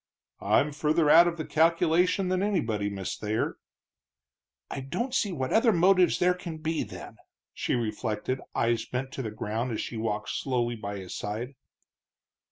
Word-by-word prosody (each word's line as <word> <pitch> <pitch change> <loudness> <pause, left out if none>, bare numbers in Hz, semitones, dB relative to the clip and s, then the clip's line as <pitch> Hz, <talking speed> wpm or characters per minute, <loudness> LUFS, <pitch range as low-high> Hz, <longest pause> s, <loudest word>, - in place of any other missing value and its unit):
"I'm 150 +2 +3
further 150 +1 +2
out 170 +2 +8
of 170 -1 -2
the 155 - -4
calculation 170 +3 +2
than 185 0 +1
anybody, 115 - 0
Miss 95 -2 -4
Thayer." 110 +1 -2 1.1
"I - - -3
don't 180 - -3
see 210 -6 +1
what 130 -6 -2
other 225 +1 +5
motive 185 0 +4
there 180 0 +3
can 175 -3 -7
be, 160 0 -2
then," - - -8 0.4
she - - -1
reflected, 115 +2 -2
eyes 115 -1 +1
bent 130 +3 -4
to 135 - -5
the 115 - -3
ground 110 +3 -3
as 110 - -3
she 115 - -5
walked 110 -1 -2
slowly 120 -3 -1
by 100 -2 -5
his 95 -2 -7
side. 115 +6 -4
135 Hz, 165 wpm, -28 LUFS, 110-175 Hz, 1.1 s, out